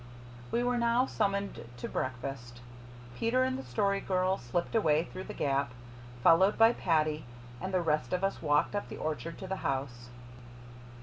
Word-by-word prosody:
We 240 - +1
were 245 0 +1
now 235 +2 +3
summoned 200 -4 -1
to 125 - -5
breakfast. 125 -1 -4 0.6
Peter 245 - +2
and 260 0 0
the 265 - -4
Story 200 -2 0
Girl 185 0 0
slipped 120 +9 -2
away 160 -8 +3
through 185 +2 -8
the - - -7
gap, 135 -3 0 0.5
followed 190 +5 +6
by 225 +1 +6
Paddy, 155 -5 +1 0.4
and 190 - -3
the 185 -2 +1
rest 150 -6 0
of 180 +1 -1
us 195 - 0
walked 150 +5 +2
up 205 - -3
the - - -7
orchard 155 +2 -4
to - - -7
the 190 +1 -2
house. 130 -5 -3
180 Hz, 170 wpm, -31 LUFS, 140-205 Hz, 0.6 s, followed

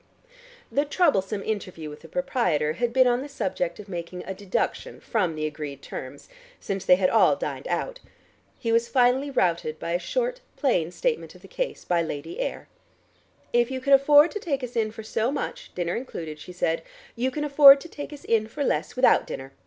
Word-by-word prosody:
The 285 - +2
troublesome 210 - +1
interview 185 -7 -4
with 150 0 -9
the 165 - -13
proprietor 180 - 0
had 235 +7 -1
been 260 +1 +5
on 245 0 +2
the 290 - -7
subject 180 -9 -3
of 210 - -9
making 180 -1 -6
a 190 - -4
deduction 200 - -3
from 185 -8 -1
the 155 0 -2
agreed 150 -2 -6
terms, - - -8 0.3
since 195 -1 -4
they 180 - +6
had 185 0 +1
all 225 - +5
dined - - -5
out. - - -2 0.6
He 230 - -2
was 230 +1 +3
finally 255 +2 +3
routed 170 - 0
by 170 - -5
a 175 - +1
short - - -2 0.2
plain 180 - +1
statement 465 - -2
of - - -17
the - - -12
case - - -4
by 175 -1 +2
Lady 160 0 -5
Ayr. - - -4 0.9
"If 240 0 +3
you 260 -1 -3
can 275 +2 +2
afford 290 +4 +7
to 415 - -4
take 280 -8 -2
us 245 -1 -6
in 220 -2 +1
for 220 0 -9
so 220 +3 -1
much, 285 - -5
dinner 175 -1 -1
included," 165 -11 -6
she 180 - -10
said, 165 -2 -1 0.3
"you 250 +2 0
can 295 +3 -4
afford 280 -1 +8
to - - -9
take 295 -2 -8
us 295 - -10
in 220 -1 +1
for 285 +6 -4
less - - -1
without 255 0 +4
dinner. 135 0 -7
225 Hz, 200 wpm, -25 LUFS, 175-275 Hz, 0.9 s, afford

